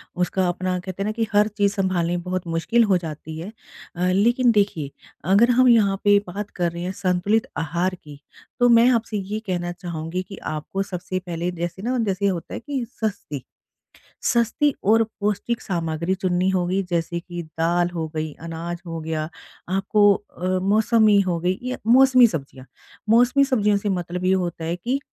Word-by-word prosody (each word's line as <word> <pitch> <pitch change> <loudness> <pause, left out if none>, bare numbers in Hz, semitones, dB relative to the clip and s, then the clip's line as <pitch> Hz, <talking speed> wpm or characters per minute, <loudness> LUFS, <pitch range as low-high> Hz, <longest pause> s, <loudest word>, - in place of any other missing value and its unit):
उसका 180 +1 0
अपना 185 +1 -2
कहते 185 +2 -5
हैं - - -3
ना 215 - 0
कि 225 0 -2
हर 210 +1 +5
चीज़ 200 -1 +2
सँभालनी 175 -3 0
बहुत 180 0 -4
मुश्किल 170 +9 +2
हो 195 -4 +3
जाती 160 -1 -7
है। 180 +6 -7 0.4
अ, 175 +1 -1
लेकिन 240 +5 +3
देखिए, 200 -10 0 0.3
अगर 200 +8 +4
हम 255 - +6
यहाँ 210 -5 +4
पे 205 0 +6
बात 200 +3 -5
कर 175 -2 0
रहे 170 0 -6
हैं 180 - -2
संतुलित 200 +5 0
आहार 175 +4 -1
की, 150 -5 -14 0.4
तो 245 - +5
मैं 235 +1 +6
आपसे 225 -3 0
ये 205 +2 -4
कहना 175 -1 -2
चाहूँगी 175 0 -5
कि 195 - -8
आपको 155 +6 -3
सबसे 185 -1 -4
पहले 175 0 -3
जैसे 175 +1 -5
ना 250 +4 -1
जैसे 200 0 -1
ये 200 - +3
होता 170 -3 -6
है - - -4
कि 265 -2 -4
सस्ती, 190 - -4 0.8
सस्ती 240 +5 +2 0.2
और 225 +1 +6 0.2
पौष्टिक 210 +3 -1
सामग्री 170 0 -2
चुननी 185 0 0
होगी 185 +1 0
जैसे 170 0 -1
कि 175 0 -7
दाल 170 +2 0
हो 165 -2 -2
गई, 155 -1 -3
अनाज 165 +1 -5
हो 165 -1 -5
गया, 155 -1 -3 0.4
आपको 200 +2 +3
अ, 185 -3 -8 0.2
मौसमी 215 +1 +4
हो 180 -3 0
गई 180 +2 0
या 255 0 -3
मौसमी 255 0 +7
सब्ज़ियाँ, 135 - -6 0.4
मौसमी 245 +4 +5
सब्ज़ियों 210 -7 +2
से 200 +1 -2
मतलब 180 -1 -3
ये 185 - +3
होता 175 -3 -2
है 165 +2 -2
कि 245 +10 -1
185 Hz, 180 wpm, -23 LUFS, 170-210 Hz, 0.8 s, मौसमी